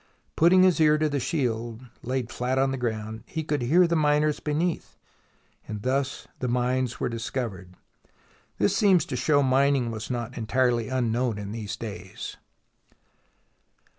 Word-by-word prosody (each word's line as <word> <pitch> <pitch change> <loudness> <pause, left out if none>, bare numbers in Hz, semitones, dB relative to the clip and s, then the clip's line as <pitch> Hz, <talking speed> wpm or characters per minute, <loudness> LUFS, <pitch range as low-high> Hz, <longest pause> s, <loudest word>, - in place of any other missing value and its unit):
Putting 185 +3 +6
his 185 -3 +4
ear 155 -1 +5
to 155 0 +1
the 145 -1 -1
shield, 120 -4 -2 0.2
laid 125 -1 -3
flat 125 +2 -1
on 135 0 +2
the 135 - -2
ground, 110 -2 -4
he 160 - -4
could 150 -3 -1
hear 165 +9 +4
the 170 0 +1
miners 150 -1 +2
be 150 - -3
neath, 165 +3 -2 0.7
and 105 -1 -6
thus 130 +1 -1
the 125 - -2
mines 125 0 0
were - - 0
discovered. 115 -6 -4 0.8
This 105 - +2
seems 190 -5 +4
to 130 - -4
show 145 +3 +3
mining 135 -2 +2
was 110 0 -6
not 120 -1 -4
entirely 120 0 +1
unknown 120 -2 0
in 100 -1 -6
these 110 -1 -5
days. 110 -2 -7
130 Hz, 155 wpm, -26 LUFS, 115-150 Hz, 0.8 s, Putting